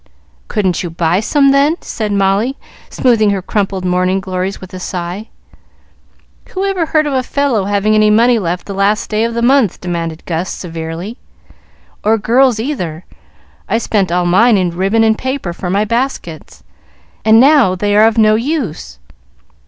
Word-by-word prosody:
"Couldn't 190 -5 -1
you 175 - -4
buy 165 +2 0
some, 275 +5 +2
then?" 280 +3 +3
said 215 -2 -4
Molly, 200 +6 +1 0.3
smoothing 230 -5 +2
her 200 -2 -1
crumpled 195 -2 -2
morning 185 +1 +1
glories, 190 0 -4
with 185 -1 -12
a 185 - -6
sigh. 180 +3 -5 1.2
"Who 385 +1 -3
ever 375 -4 -1
heard 310 0 +1
of 290 - -2
a 260 - +1
fellow 255 -5 -1
having 205 +1 +1
any 215 0 +4
money 230 +2 +4
left 175 -2 -3
the 200 - -6
last 200 +3 0
day 215 +1 +1
of 230 0 -2
the 235 - -1
month?" 255 -5 +2
demanded 170 -2 -5
Gus, 170 +1 -3
severely. 165 +5 -6 0.8
"Or 220 +2 +3
girls 240 +2 +2
either. 185 - -4 0.6
I - - +2
spent 205 -5 -1
all 175 0 +1
mine 210 +6 +4
in 180 -2 0
ribbon 195 +6 +1
and 220 0 +3
paper 260 -8 -4
for 180 +1 -5
my 200 +3 +1
baskets, 230 - -4 0.6
and 220 +1 +5
now 270 -8 +5
they 205 +2 0
are 215 +1 +6
of 225 0 -1
no 215 -1 +5
use. 230 - -3
210 Hz, 170 wpm, -14 LUFS, 185-235 Hz, 1.2 s, are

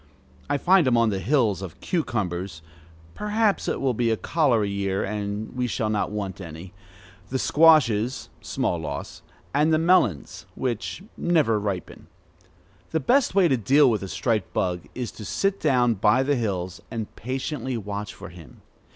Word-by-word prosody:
I 145 - +2
find 180 0 +4
him 120 -2 +3
on 115 -1 +4
the 95 - -2
hills 110 - +1
of 95 -5 -8
cucumbers 95 - -3 0.5
(perhaps 210 0 0
it - - -1
will 135 -2 +1
be 120 0 0
a 110 - +1
cholera 125 -10 +1
year, 100 -1 -1
and 105 +1 -4
we 125 -1 0
shall 110 -2 -1
not 105 -1 0
want 100 -2 -5
any), 85 +2 -9 0.6
the 130 - -1
squashes 130 -7 +4
(small 85 - -1
loss), 75 -3 -6 0.3
and 150 +3 +3
the 155 - +4
melons 160 - +1
(which 125 - -3
never 155 -11 +2
ripen). 100 -4 -5 0.8
The 160 - 0
best 245 - +2
way 190 -3 +5
to 135 -5 +2
deal 135 +5 +4
with 110 - -1
the 95 - -5
striped 110 +1 -1
bug 90 -2 -1
is 125 -2 -4
to 110 - -10
sit 195 - -1
down 125 -5 +3
by 110 +5 +3
the 145 +1 +1
hills, 95 -7 -3
and 110 -2 -6
patiently 130 +1 -3
watch 105 -1 -5
for - - -10
him. 85 -3 -15
115 Hz, 165 wpm, -25 LUFS, 100-145 Hz, 0.8 s, way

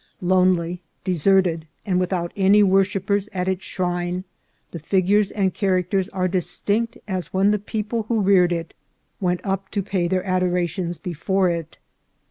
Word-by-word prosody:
Lonely, 180 -1 +2 0.2
deserted, 180 -2 +2 0.2
and 180 -2 +1
with 180 0 -1
out 175 -2 -1
any 200 +1 +5
worshippers 195 +1 +1
at 180 -1 -2
its 190 0 -1
shrine, 175 0 -2 0.5
the 170 - -6
figures 195 +5 +2
and 190 -3 0
char 190 -3 +1
acters 190 +2 -1
are 185 -1 0
distinct 200 +5 -1
as 185 -3 -3
when 195 +2 +3
the 210 - +1
people 215 +2 -3
who 230 -1 +1
reared 190 -3 +4
it 165 -1 -3 0.5
went 180 -2 0
up 195 0 -2
to 200 - -2
pay 185 -3 -1
their 185 +1 -1
adorations 180 -2 0
before 185 +1 0
it. 165 -2 -5
185 Hz, 155 wpm, -22 LUFS, 175-195 Hz, 0.5 s, any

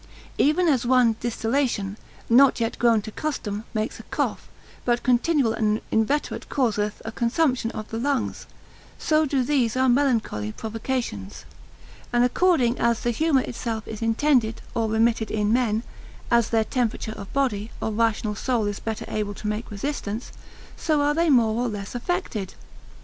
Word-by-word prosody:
Even 325 +5 +3
as 270 -6 +3
one 245 -2 +4
distillation, 230 -3 -1 0.3
not 255 +3 +5
yet 230 -1 -2
grown 230 -3 +4
to 215 - -7
custom, 215 -7 -4
makes 215 0 -3
a - - -9
cough; - - -2 0.3
but 240 -1 +1
continual 255 -1 +2
and 215 -1 +1
inveterate 250 +7 0
causeth 210 -5 0
a 225 - -4
consumption 240 +1 +1
of 215 -1 -6
the 225 - -3
lungs; 275 +1 -1 0.5
so 310 0 +2
do 265 -2 +1
these 250 -4 +1
our 260 0 +3
melancholy 240 - +1
provocations: 225 - -4 0.7
and 240 0 +3
according 250 -2 +2
as 235 -1 +2
the 240 - +1
humour 290 +2 +2
itself 230 -3 -4
is 220 0 -7
intended, 230 0 +2
or 225 -1 0
remitted 225 0 +2
in 210 0 +1
men, 230 -3 +1 0.5
as 235 -2 +4
their 225 -1 +2
temperature 235 -3 -1
of 200 - -9
body, 230 -6 0
or 220 - -2
rational 220 -1 +1
soul 230 +1 0
is 205 -1 -3
better 220 -2 -4
able 210 -1 -3
to 210 - -6
make 210 +2 -3
resistance; 215 0 -4 0.4
so 310 -3 +1
are 290 +1 +2
they 335 +2 +2
more 235 -4 +3
or - - 0
less 205 -3 -5
affected. 245 - -3
235 Hz, 160 wpm, -24 LUFS, 215-260 Hz, 0.7 s, not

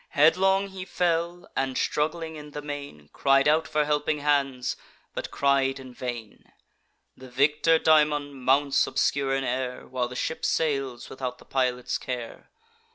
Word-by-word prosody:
Headlong 190 +6 +3
he 190 -1 -7
fell, 175 -1 -1
and, 135 -1 -1
struggling 160 +2 -1
in 150 -1 -9
the 150 - -5
main, 140 - -7
Cried 135 0 +3
out 155 +2 +3
for 150 0 +1
helping 150 0 0
hands, 140 -3 +1 0.4
but - - -4
cried 135 -1 +1
in 130 -1 -11
vain. 120 -4 -7 0.6
The 130 0 -12
victor 150 +5 +3
daemon 150 -2 +3
mounts 135 +2 +2
obscure 135 -1 +1
in 135 - -1
air, 125 0 -3
While 125 -1 -2
the 125 - -9
ship 160 - -3
sails 135 -6 -1
without 125 -2 -5
the - - -17
pilot's 125 -2 -1
care. 125 -2 -6
140 Hz, 150 wpm, -26 LUFS, 130-155 Hz, 0.6 s, Headlong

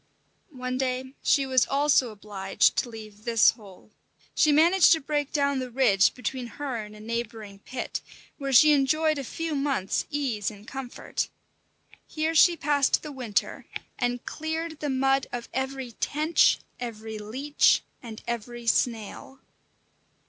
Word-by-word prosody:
One 255 0 -3
day 260 0 -2
she 275 -2 +3
was 260 -2 +3
also 275 -3 +3
obliged 205 -2 0
to 245 - 0
leave 215 -2 -11
this 230 -2 +5
hole. 210 -2 -16 0.4
She 305 - +4
managed 340 +6 +6
to 320 - +1
break 290 -1 -2
down 280 -2 +1
the 255 -1 -4
ridge 230 -6 +3
between 250 0 -4
her 280 -4 -3
and 210 -1 -7
a - - -12
neighbouring 220 -2 -5
pit, 255 +4 -5 0.4
where 275 -1 -3
she 300 +4 +7
enjoyed 305 +2 +2
a - - -4
few 325 +5 -4
months' 275 -9 -1
ease 260 -9 -1
and 210 0 -14
comfort. 265 -2 -4 0.8
Here 315 +1 -1
she 340 +2 +6
passed 285 -1 +2
the 300 - -6
winter, 245 -6 -2 0.3
and 245 0 -1
cleared 320 0 -4
the 295 - -3
mud 270 0 +1
of 245 -1 -5
every 265 -1 -3
tench, 305 +8 +2 0.2
every 220 -2 -6
leech, 260 +8 +2 0.2
and 225 -2 -9
every 235 0 -5
snail. 230 +3 -1
260 Hz, 145 wpm, -26 LUFS, 225-290 Hz, 0.8 s, she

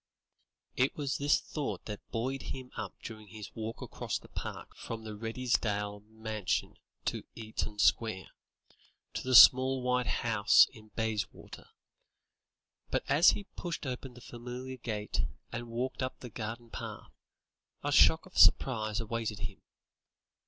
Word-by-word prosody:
It 130 +2 +2
was 140 -3 -2
this 145 +1 +4
thought 150 -3 -4
that 105 -2 -8
buoyed 130 +4 -2
him 130 -1 -7
up 110 -3 -5
during 110 -2 -8
his 105 -2 -9
walk 110 0 -5
across - - -3
the - - -15
park - - -7
from 115 -1 -6
the 110 -1 -6
Redesdale's 105 -3 -1
mansion 110 -2 -2 0.4
in - - -6
Eaton 110 -2 -4
Square, 105 -3 +2 0.8
to - - -3
the 130 0 +2
small 130 +2 +8
white 125 -1 +1
house 110 -3 +5
in 110 -1 -14
Bayswater; 110 -2 -3 1.2
but - - 0
as 155 +5 +6
he 205 - -7
pushed 170 -4 -4
open 130 -1 -5
the 125 - -12
familiar 125 +2 -7
gate 105 -3 -2 0.3
and 120 0 -5
walked 125 +4 -3
up 130 0 -3
the 125 - -9
garden 115 +2 -6
path, - - -7 0.7
a - - 0
shock - - +6
of - - -17
surprise 110 -5 +5
awaited 115 -2 -3
him. 105 -3 -5
115 Hz, 140 wpm, -31 LUFS, 110-130 Hz, 1.2 s, small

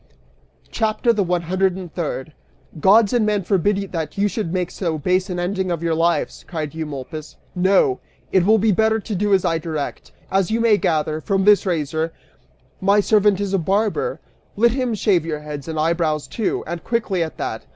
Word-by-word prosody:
CHAPTER 225 +1 +1
THE 210 - 0
ONE 175 -1 -1
HUNDRED 185 +2 +1
AND 180 -4 -8
THIRD. 155 -4 -4 0.5
"Gods 205 +6 +5
and 240 -2 +3
men 210 -2 +1
forbid 195 +2 0
that 160 -2 -4
you 200 +1 +2
should 205 -4 -3
make 180 -1 -1
so 165 -4 -2
base 185 +5 0
an 180 - -3
ending 190 +1 -1
of 170 -1 -2
your 165 -1 +1
lives," 165 -1 0
cried 155 -4 -4
Eumolpus. 155 -1 -6 0.2
"No! 185 -8 +3 0.3
It 190 - +4
will 215 +4 +5
be 215 +1 +3
better 220 +3 +2
to 215 +1 -6
do 205 +2 0
as 195 -2 +3
I 165 -2 +1
direct. 155 -3 -5 0.2
As 195 -1 +2
you 225 +1 0
may 230 -3 +4
gather, 155 -4 0
from 195 +1 0
his 210 -1 +5
razor, 160 -1 -1 0.7
my 200 +2 +3
servant 205 -1 +3
is 200 -1 -2
a 195 - +3
barber: 205 - 0 0.4
let 235 +3 +4
him 250 -2 -1
shave 195 -5 +2
your 155 -2 -4
heads 150 -1 -7
and 160 -1 -3
eyebrows, 155 -2 0
too, 220 - -2
and 170 0 -5
quickly 220 -6 -1
at 160 -1 -3
that! - - -5
185 Hz, 195 wpm, -21 LUFS, 160-205 Hz, 0.7 s, Gods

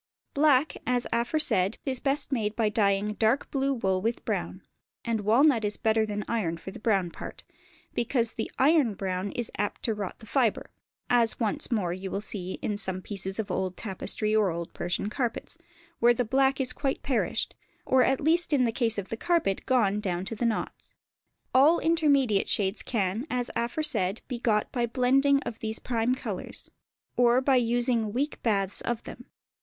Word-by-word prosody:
Black, 290 0 +3
as 245 0 +1
aforesaid, 235 -6 +2
is 260 -3 -2
best 280 +1 +1
made 215 -5 -1
by 220 -2 +1
dyeing 205 0 +1
dark 225 +5 +1
blue 275 0 0
wool 190 -8 0
with 230 +3 -2
brown; - - -3 0.4
and 230 -2 0
walnut 235 +3 +4
is 210 0 -1
better 220 0 +1
than 210 0 -3
iron 180 -8 -1
for 190 - -8
the 235 - -10
brown 195 -6 +1
part, - - -9 0.5
because 235 -1 0
the 220 - -4
iron 275 -6 +3
brown 190 0 -3
is 240 -2 -3
apt 205 - -2
to 225 - 0
rot 205 -3 -5
the 225 - -13
fibre; 235 -2 0 0.4
as 235 -2 +3
once 225 +2 -1
more 190 -7 0
you 190 +1 -6
will 195 - -2
see 190 -3 -4
in 205 -1 -2
some 190 -2 -3
pieces 195 -1 -4
of 220 -3 -3
old 185 -1 -2
tapestry 215 +1 -2
or 210 -3 +3
old 170 0 -5
Persian 175 +3 -2
carpets, 240 +6 -3 0.4
where 240 +1 +5
the 245 - 0
black 270 +3 +2
is 255 -2 +2
quite 270 -2 -2
perished, 265 -4 -1 0.3
or 260 0 +4
at 265 0 +2
least 335 +3 +3
in 270 -3 +4
the 230 - +1
case 225 -2 0
of 200 -2 -4
the - - -3
carpet 335 - 0
gone 215 -6 +2
down 185 -3 -2
to 215 - -2
the 235 +2 0
knots. 225 - -4 0.6
All 290 +6 +6
intermediate 285 -10 +2
shades 195 0 +1
can, 215 +3 -2
as 245 -2 -2
aforesaid, 235 -6 0
be 250 -2 -4
got 215 -3 +1
by 240 -2 0
the 230 - -20
blending 275 +2 +3
of 225 - -6
these 220 0 -3
prime 240 +1 0
colours, - - -6 0.5
or 245 0 +5
by 265 0 +3
using 240 -2 +1
weak 280 +5 -2
baths 200 -4 0
of 240 -2 -3
them. 245 - -10
230 Hz, 185 wpm, -27 LUFS, 205-260 Hz, 0.6 s, All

